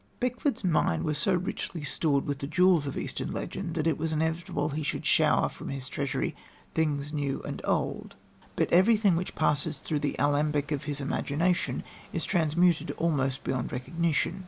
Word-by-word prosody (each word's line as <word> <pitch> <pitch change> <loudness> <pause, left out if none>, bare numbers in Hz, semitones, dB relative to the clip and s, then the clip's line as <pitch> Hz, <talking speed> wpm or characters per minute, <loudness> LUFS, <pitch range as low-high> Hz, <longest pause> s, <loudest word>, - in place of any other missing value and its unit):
Beckford's 250 +1 -1
mind 155 - +2
was 150 -1 0
so 185 +4 +2
richly 175 -2 -3
stored 145 -1 +1
with 140 -1 -2
the 140 - -4
jewels 175 -2 +4
of 135 - -4
Eastern - - -3
legend 175 -4 -4
that 155 -2 0
it 160 -3 +1
was 160 +1 -1
inevitable 160 -1 -1
he 150 +1 -3
should 145 - -3
shower - - +4
from - - -8
his 135 -1 -4
treasury 140 0 -2 0.4
things 150 -2 0
new 140 -2 -2
and - - -5
old, - - -1 0.4
but - - 0
everything 205 +1 +5
which 180 +2 -3
passes 150 0 +1
through 150 - -2
the 145 -1 -1
alembic 145 0 +1
of 145 -1 -2
his 145 -1 -2
imagination 160 +5 0 0.3
is - - -1
transmuted 170 0 +2
almost 135 -5 0
beyond 130 -2 -2
recognition. 165 +6 0
155 Hz, 170 wpm, -28 LUFS, 145-170 Hz, 0.4 s, everything